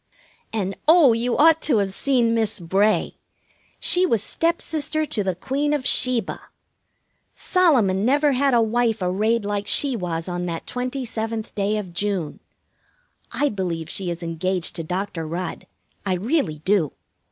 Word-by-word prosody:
And, 195 -3 -2
oh, 315 -6 +7
you 235 +2 -1
ought 320 +1 +5
to 280 - +2
have 195 -2 0
seen 240 -1 +1
Miss 220 -2 -1
Bray! 195 +5 +1 0.6
She 360 - +4
was 230 - +1
stepsister 310 -1 -1
to 215 -8 -2
the 190 -2 -1
Queen 280 +10 -1
of 285 -4 -2
Sheba. 245 -6 +1 0.9
Solomon 245 - +2
never 285 +5 +3
had 270 0 +2
a 230 - +4
wife 230 0 +1
arrayed 210 +5 0
like 205 0 -2
she 275 +2 +3
was 170 -5 -3
on 175 0 -3
that 165 -1 -5
twenty 250 +1 -4
seventh 225 -1 -4
day 205 +1 0
of 190 -5 -6
June. 190 -5 -2 0.9
I 290 - +1
believe 175 - -4
she 190 -2 -2
is 170 0 -5
engaged 170 +2 -2
to 165 - -3
Doctor 180 -1 -4
Rudd. 175 +2 -5 0.4
I 190 -2 0
really 180 - -1
do. 190 -7 +2
215 Hz, 150 wpm, -22 LUFS, 185-255 Hz, 0.9 s, oh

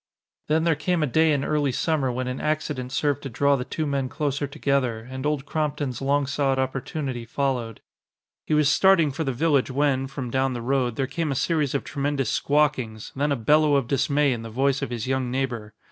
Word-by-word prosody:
Then 160 +1 +2
there 165 -1 +3
came 165 +2 0
a - - +3
day 160 +4 +3
in 140 -2 0
early 145 -3 +1
summer 140 0 0
when 125 +1 -3
an 125 +1 -4
accident 150 -4 -2
served 145 0 0
to 135 - -6
draw 140 +4 +2
the 125 - -2
two 155 +4 -3
men 140 -3 -1
closer 145 -1 -2
together, 135 -5 0
and 130 +2 -4
Old 150 -2 -1
Crompton's 145 -5 -2
long 140 +1 +2
sought 140 -1 0
opportunity 130 -1 -3
followed. 120 -2 -2 0.7
He 155 - +2
was 150 -1 +4
starting 170 -1 +4
for 160 +4 -3
the 135 - -1
village 140 +1 +2
when, 135 0 +1
from 135 -3 -6
down 130 0 +1
the 120 - -4
road, 125 -2 0
there 135 - 0
came 150 +3 -2
a - - -1
series 150 -1 0
of 140 - -1
tremendous 140 -4 -1
squawkings, 140 -7 0
then 145 +2 0
a - - +3
bellow 150 +5 +3
of 135 -4 +1
dismay 140 +1 +2
in 115 - -5
the 115 - -7
voice 135 +4 +1
of - - -2
his 120 -3 -4
young 130 -1 -1
neighbor. 120 -5 -3
140 Hz, 210 wpm, -24 LUFS, 130-150 Hz, 0.7 s, was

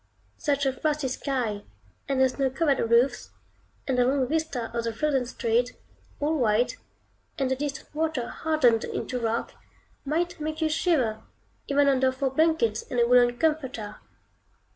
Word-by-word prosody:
Such 285 -2 0
a 265 - +1
frosty 300 +1 -1
sky, 250 -6 -2 0.5
and 270 -1 +1
the 265 - +6
snow 265 +1 -1
covered 280 +1 +1
roofs, 245 +2 +3 0.6
and 255 -2 +1
the - - +5
long 265 0 +1
vista 305 -6 -2
of 235 - -1
the 230 - -2
frozen 270 -1 0
street, 240 +1 0 0.5
all 300 +1 0
white, 230 0 +2 0.6
and 265 -2 0
the - - +2
distant 280 +2 -5
water 310 -5 -1
hardened 275 -9 +2
into 250 - -3
rock, 230 0 -1 0.5
might 340 +4 -1
make 310 +1 -4
you 320 -1 +1
shiver, 285 -10 +1 0.5
even 285 0 +3
under 265 -1 +3
four 260 0 -2
blankets 270 -7 +2
and 245 - -1
a 235 - +5
woollen 245 0 +4
comforter. 265 -8 -1
265 Hz, 155 wpm, -26 LUFS, 245-300 Hz, 0.6 s, the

